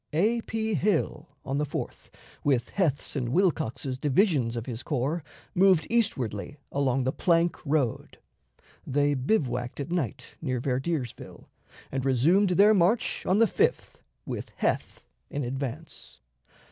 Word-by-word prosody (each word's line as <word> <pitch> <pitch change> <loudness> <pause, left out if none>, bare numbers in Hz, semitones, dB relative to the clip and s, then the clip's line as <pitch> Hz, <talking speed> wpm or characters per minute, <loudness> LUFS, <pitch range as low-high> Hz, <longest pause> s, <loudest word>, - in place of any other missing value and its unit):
A. 220 +9 +2
P. 220 -1 -1
Hill, 185 -3 0 0.2
on 135 +1 -1
the - - +1
4th, 145 - -5 0.3
with 135 -5 +1
Heth's 155 -9 -1
and 125 -4 -1
Wilcox's 135 - 0
divisions 145 - +2
of 115 -1 -4
his 120 -1 -5
corps, 145 +4 -1 0.3
moved 185 -4 +4
eastwardly 140 - 0
along 135 -2 +1
the 130 - +1
plank 170 +2 +2
road. 140 -6 0 0.7
They 145 +2 +2
bivouacked 130 - -1
at 145 +4 -4
night 135 -7 -3
near 130 -5 -1
Verdiersville, 130 +1 -3 0.5
and 135 -1 -2
resumed 155 +10 +3
their 200 +4 +6
march 200 +4 +1
on 185 - +3
the 230 - +6
5th 455 - 0 0.3
with - - -5
Heth - - -1 0.3
in 145 - -3
advance. 135 - -6
145 Hz, 135 wpm, -27 LUFS, 130-180 Hz, 0.7 s, their